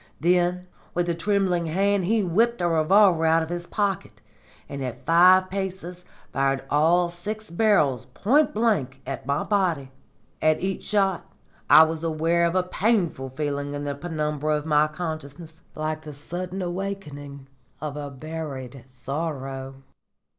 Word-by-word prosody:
Then 180 +2 +2 0.3
with 175 0 0
a - - +2
trembling 180 -1 0
hand 195 +3 +1
he 220 +2 +2
whipped 225 +7 +2
a 175 - +1
revolver 170 +2 +4
out 160 0 +4
of 160 - -7
his 175 0 -4
pocket, 200 -4 -2 0.5
and 140 -1 -5
at 125 -2 -6
five 185 +3 +6
paces 185 -2 -5 0.3
fired 135 0 +1
all 170 +4 +4
six 210 +4 -6
barrels 170 - +2
point 255 - +2
blank 200 - 0
at 135 -1 -6
my 140 - 0
body. 175 -10 0 0.5
At 155 0 +3
each 190 0 -3
shot 195 -3 0 0.4
I 160 - +10
was 160 0 -2
aware 165 +1 +1
of 170 - -3
a 185 - +3
painful 180 - 0
feeling 145 +1 -3
in 145 - -4
the 145 -1 -2
penumbra 150 -1 -2
of 150 - -6
my 150 -1 +3
consciousness, 155 0 -7
like 155 0 -3
the 150 -2 -9
sudden 180 +5 -5
awakening 160 -7 -5 0.3
of 150 -2 -5
a 145 -1 -5
buried 140 -3 -7
sorrow." 135 0 -5
165 Hz, 145 wpm, -25 LUFS, 145-185 Hz, 0.5 s, I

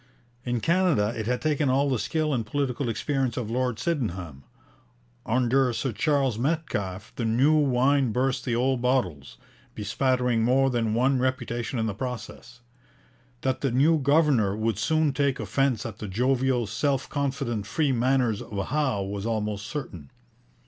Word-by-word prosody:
In 120 -2 -2
Canada 165 - +2
it 110 -1 -4
had 125 0 -1
taken 150 -2 +1
all 135 +2 +2
the 130 -4 0
skill 155 +6 -1
and 120 -3 0
political 130 +2 -2
experience 130 +1 -1
of 115 -3 -3
Lord 125 -1 0
Sydenham; 95 - -3 0.8
under 125 +2 +2
Sir 130 +2 -2
Charles 135 0 +1
Metcalfe 120 - -2
the 120 - -2
new 120 +7 +3
wine 135 -3 +3
burst 130 +3 0
the 120 - -1
old 130 +1 +1
bottles, 95 - -1 0.4
bespattering 125 +2 0
more 135 +3 +3
than 115 -3 0
one 130 +2 +2
reputation 125 -1 -2
in 110 - 0
the 110 - -2
process. 125 +1 -7 0.8
That 130 -1 -1
the 135 - +1
new 145 +6 +3
governor 140 -8 +3
would 110 -2 -1
soon 155 +1 +1
take 140 -2 0
offence 135 -5 0
at 110 -3 -7
the 105 - -5
jovial, 125 +3 +1
self 135 +6 -1
confident, 135 -7 -2
free 150 -4 +1
manners 125 -3 +1
of 100 -5 -5
Howe 130 -8 0
was 100 +2 -4
almost 105 -2 -2
certain. 90 - -6
125 Hz, 155 wpm, -26 LUFS, 110-135 Hz, 0.8 s, new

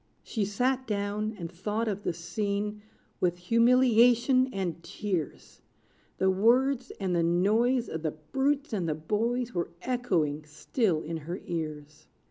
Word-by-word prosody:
She 215 -4 -2
sat 255 +6 0
down, 210 +1 -2
and 170 -2 -6
thought 210 +6 -2
of 205 -2 -2
the - - -1
scene 205 +5 -3 0.4
With 175 -1 +1
humiliation 245 +4 +4
and 180 -6 -3
tears: 185 -4 -4 0.6
The 190 0 +3
words, 250 +6 +3
and 185 -3 0
the 170 - +3
noise 215 +9 +2
Of 160 - -5
the 160 - 0 0.2
brutes 275 0 0
and 180 -6 -1
the 155 - 0
boys 230 +9 -1
Were 175 -1 -1
echoing 175 - 0
still 160 - -1
in 165 +1 -4
her 170 +4 -6
ears. 155 -3 -5
205 Hz, 140 wpm, -28 LUFS, 170-240 Hz, 0.6 s, humiliation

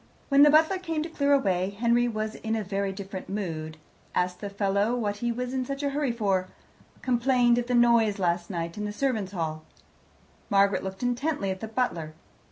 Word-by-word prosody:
When 280 0 +5
the 295 - +8
butler 320 +5 +4
came 325 -4 -2
to 330 - -6
clear 285 -3 0
away, 195 -7 +1
Henry 240 +1 +3
was 215 -1 -3
in 225 0 -3
a 220 - -1
very 195 0 -2
different 190 -1 -7
mood 160 -6 -4 0.4
asked 180 0 0
the 205 - -4
fellow 200 +3 0
what 205 -4 -2
he 235 +3 -1
was 250 +2 -4
in 260 -1 0
such 275 +2 -5
a 280 - 0
hurry 285 -2 0
for, 195 -5 0 0.6
complained 245 -1 +3
of 240 - -3
the 250 - +1
noise 235 -3 +4
last 175 -2 0
night 170 0 -4
in 210 - -2
the 205 - -4
servants' 220 -6 -1
hall. 155 -3 -3 0.9
Margaret 200 0 +3
looked 190 +3 -6
intently 245 -3 -1
at 190 - -5
the 220 - -5
butler. 175 -10 -2
215 Hz, 195 wpm, -27 LUFS, 190-250 Hz, 0.9 s, the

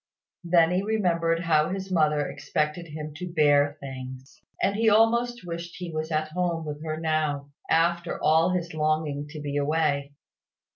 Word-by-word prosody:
Then 170 -1 +4
he 180 +1 +1
remembered 170 -6 +1
how 155 -2 +2
his 190 0 -4
mother 150 -4 +2
expected 155 +3 -2
him 150 0 -7
to 180 +1 -6
bear 145 -2 +3
things; 130 -1 -9 0.2
and 200 - +1
he 225 +1 +3
almost 235 +1 +3
wished 170 0 -6
he 180 -2 -6
was 155 0 -3
at 155 0 0
home 170 -1 -1
with 150 0 -6
her 155 -1 -3
now, 155 -3 -1 0.2
after 170 +1 +1
all 160 +3 +4
his 175 -3 -2
longing 155 -2 -1
to 150 +1 -8
be 145 -1 -3
away. 145 -1 0
160 Hz, 160 wpm, -26 LUFS, 150-175 Hz, 0.2 s, Then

